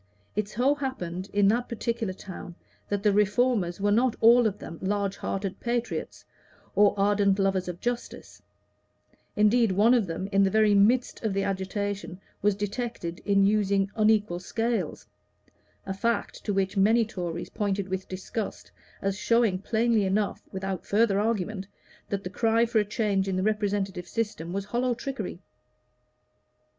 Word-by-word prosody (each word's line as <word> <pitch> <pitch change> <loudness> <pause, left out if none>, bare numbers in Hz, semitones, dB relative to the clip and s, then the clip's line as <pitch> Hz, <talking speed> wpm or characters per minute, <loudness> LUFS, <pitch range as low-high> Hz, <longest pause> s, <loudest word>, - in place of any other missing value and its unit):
It 210 0 0
so 250 +6 +2
happened 200 -10 -4
in 205 -1 +3
that 240 +3 0
particular 230 -2 -2
town 180 -2 -9 0.3
that 205 -1 -1
the 210 -2 +4
Reformers 210 -3 +2
were 205 +1 +1
not 235 +3 +3
all 235 +1 +6
of 205 -1 -3
them 165 -5 -9
large 200 0 -1
hearted 195 -1 -3
patriots 240 0 -3 0.5
or 205 +1 +5
ardent 200 -1 +3
lovers 195 -2 +1
of 175 -1 -5
justice; 240 0 -5 0.9
indeed, 215 +1 +4
one 215 +6 +5
of 230 -6 +2
them, 170 +3 -4
in 195 0 +4
the 195 - +3
very 215 +1 +4
midst 230 +7 +3
of 215 -3 -1
the 195 - +1
agitation, 195 0 -3 0.2
was 205 0 +2
detected 205 -4 -4
in 200 -1 +4
using 200 -1 +2
unequal 210 -5 +2
scales 200 - -2 0.8
a 195 - -3
fact 230 +2 -2
to 210 - 0
which 195 0 0
many 220 +4 +4
Tories 175 -5 -5
pointed 200 -2 -1
with 190 0 -4
disgust 190 +3 -5 0.3
as 195 0 0
showing 230 -6 +2
plainly 225 +1 +1
enough, 200 +2 0
without 190 -1 -4
further 205 -1 +2
argument, 210 -2 -1 0.4
that 200 -1 -2
the 180 - -4
cry 225 +2 +2
for 230 -1 +1
a 210 - +1
change 205 -2 0
in 190 - -1
the 185 - 0
representative 200 -3 -1
system 210 -7 -3
was 195 +1 -3
hollow 240 +3 0
trickery. 230 -8 -5
205 Hz, 155 wpm, -27 LUFS, 190-225 Hz, 0.9 s, all